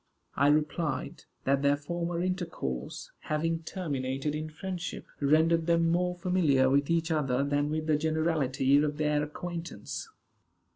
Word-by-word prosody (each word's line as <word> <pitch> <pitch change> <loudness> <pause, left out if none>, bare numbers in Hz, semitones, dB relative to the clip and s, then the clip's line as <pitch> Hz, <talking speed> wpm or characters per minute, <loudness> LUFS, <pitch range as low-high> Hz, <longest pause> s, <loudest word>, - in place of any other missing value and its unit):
I 140 - +4
replied, 150 0 0 0.2
that 135 +1 +2
their 140 0 +3
former 170 +3 -3
intercourse, 170 - -3
having 165 +2 -1
terminated 145 -5 -3
in 155 +1 -3
friendship, 180 +2 -5
rendered 160 +3 +3
them 165 -1 +3
more 180 +1 +1
familiar 165 -8 +3
with 140 +1 +2
each 165 0 +1
other 135 -4 +1
than 145 +1 0
with 155 +1 -2
the 155 -1 +2
generality 150 -4 +2
of 150 -1 -1
their 150 -1 +1
acquaintance. 175 - -5
155 Hz, 135 wpm, -29 LUFS, 145-170 Hz, 0.2 s, I